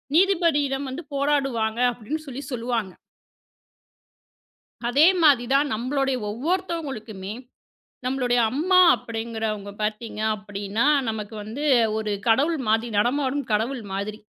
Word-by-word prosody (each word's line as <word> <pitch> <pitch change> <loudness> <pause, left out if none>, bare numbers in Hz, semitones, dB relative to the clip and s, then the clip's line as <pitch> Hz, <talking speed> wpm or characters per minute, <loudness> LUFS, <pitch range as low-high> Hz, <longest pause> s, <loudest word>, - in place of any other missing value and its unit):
நீதிபதியிடம் 315 -7 +2
வந்து 315 +6 -6
போராடுவாங்க 270 -6 0
அப்படின்னு 290 +8 -5
சொல்லிச் 270 +1 -7
சொல்லுவாங்க. 230 -5 -2 1.9
அதே 285 +7 +5 0.2
மாதிரி 275 -5 +6
தான் 290 +1 +3
நம்மளோட 270 +4 -1 0.2
ஒவ்வொருத்தங்களுக்குமே, 260 - -3 0.7
நம்மளோட 255 -1 0 0.2
அம்மா 350 +9 +3 0.2
அப்படிங்கிறவங்க 225 -3 -4
பாத்தீங்கன்னா, 215 0 -2 0.2
நமக்கு 220 0 -4
வந்து 235 +8 -5 0.3
ஒரு 215 -1 -2 0.2
கடவுள் 285 +8 +3
மாதிரி, 225 +2 +2
நடமாடும் 275 +4 +1
கடவுள் 230 +4 0
மாதிரி. 205 +2 -4
245 Hz, 95 wpm, -24 LUFS, 220-285 Hz, 1.9 s, மாதிரி